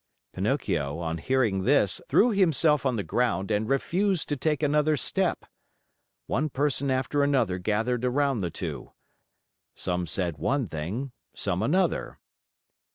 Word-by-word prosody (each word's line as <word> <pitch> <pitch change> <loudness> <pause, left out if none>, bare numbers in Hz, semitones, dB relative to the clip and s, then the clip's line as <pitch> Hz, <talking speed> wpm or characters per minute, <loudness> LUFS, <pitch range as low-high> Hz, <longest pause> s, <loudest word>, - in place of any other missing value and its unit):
Pinocchio, 70 +1 -1
on 85 -1 -3
hearing 115 -4 +1
this, 125 -6 +2
threw 240 +3 +5
himself 160 - +3
on 130 - 0
the 105 - -2
ground 110 -5 0
and 105 +2 0
refused 180 +7 0
to 145 - 0
take 150 +2 -1
another 150 +1 +2
step. - - -1 0.8
One 150 +8 -1
person 140 0 0
after 130 +2 0
another 130 -10 +1
gathered 115 +6 0
around 135 -1 +1
the 90 - -1
two. - - -6 0.8
Some 90 -1 -2
said 85 0 -2
one 135 -3 0
thing, 95 - -4 0.2
some 95 -2 -1
another. 175 - 0
130 Hz, 135 wpm, -27 LUFS, 95-145 Hz, 0.8 s, threw